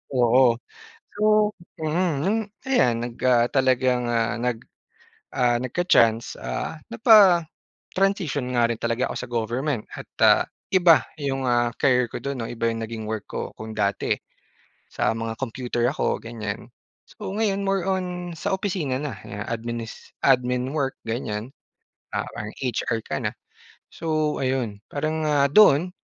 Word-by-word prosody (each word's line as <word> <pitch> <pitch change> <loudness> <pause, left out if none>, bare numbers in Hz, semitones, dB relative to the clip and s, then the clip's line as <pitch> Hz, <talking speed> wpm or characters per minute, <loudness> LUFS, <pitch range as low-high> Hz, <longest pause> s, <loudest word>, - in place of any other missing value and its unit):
oo. 120 0 +5 0.6
So 210 - -4 0.6
mm, 165 +2 +1
nung 200 +6 +1 0.3
ayan 120 - +3
nag 120 -1 -5
ah, 120 -2 +5
talagang 130 -2 +2 0.3
nag 120 -1 -1 0.7
ah, 125 -3 +2
nagka-chance 120 -6 +2
ah, 60 - -3
napa-transition 205 -8 +5 0.9
nga 120 - +3
rin 115 - -3
talaga 115 +2 -1
ako - - -6
sa 125 - -6
government 120 +2 -1
at - - -9
ah, - - +6 0.3
iba 170 -7 +6 0.2
yung 135 -1 -1
ah, 120 0 +2
care 125 -3 +3
ko - - -5
do'n 140 -3 -4
'no 115 - -4
iba 115 -1 -3
yung 115 - -5
naging 110 -1 -6
work 110 -2 -3
ko, - - -4
kung 110 0 -7
dati 100 -1 +1 0.8
sa - - +1
mga 115 0 -4
computer 120 -1 -3
ako, 150 - -1
ganyan. 110 -1 -5 0.4
So 210 - -9
ngayon 205 -2 +1
more 195 -2 +1
on 180 -2 -2
sa - - -2
opisina 185 -9 -2
na 140 -7 -4
ya 105 0 -5
adminis 115 0 -5
admin 125 -1 +2
work 140 -3 -1
ganyan, 110 0 -4 0.6
ah, - - 0
parang 105 +1 -7
HR 115 -2 -1
ka - - -4
na. - - -3 0.6
So, 155 -2 -1
ayun 130 -6 -1
parang, 155 +2 -2
ah, 145 -2 +3
doon 180 -3 +6
125 Hz, 145 wpm, -24 LUFS, 115-155 Hz, 0.9 s, ah